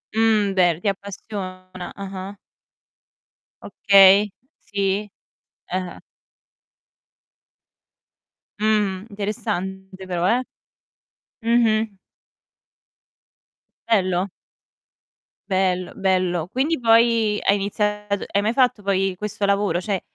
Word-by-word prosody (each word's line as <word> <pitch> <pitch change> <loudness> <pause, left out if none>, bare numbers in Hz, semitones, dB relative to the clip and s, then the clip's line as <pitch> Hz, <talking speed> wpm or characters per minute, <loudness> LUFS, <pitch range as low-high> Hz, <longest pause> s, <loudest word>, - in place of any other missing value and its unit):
Mh, 220 -3 +3
beh, 175 -3 +3
ti - - -2
appassiona 185 -2 -6
Ah-ah. 195 0 -7 1.3
Okay. 200 +1 +5 0.3
Sì. 200 0 -2 0.6
Eh-eh. 185 0 -4 2.6
Mh, 210 -3 +1
interessante 190 -2 -4
però, 175 -1 0
eh. 245 +5 +2 1.0
Mh-mh. 225 -3 +2 1.9
Bello. 185 -4 +1 1.2
Bello, 185 -1 0
bello. 185 -3 0
Quindi 285 - 0
poi 230 -2 +3
hai 200 - +3
iniziato 210 0 -2
hai 200 - +3
mai 215 +2 +1
fatto 250 -3 +2
poi 195 -1 0
questo 210 +1 -3
lavoro? 200 -2 +1
Cioè, 195 0 -2
200 Hz, 80 wpm, -22 LUFS, 185-215 Hz, 2.6 s, Okay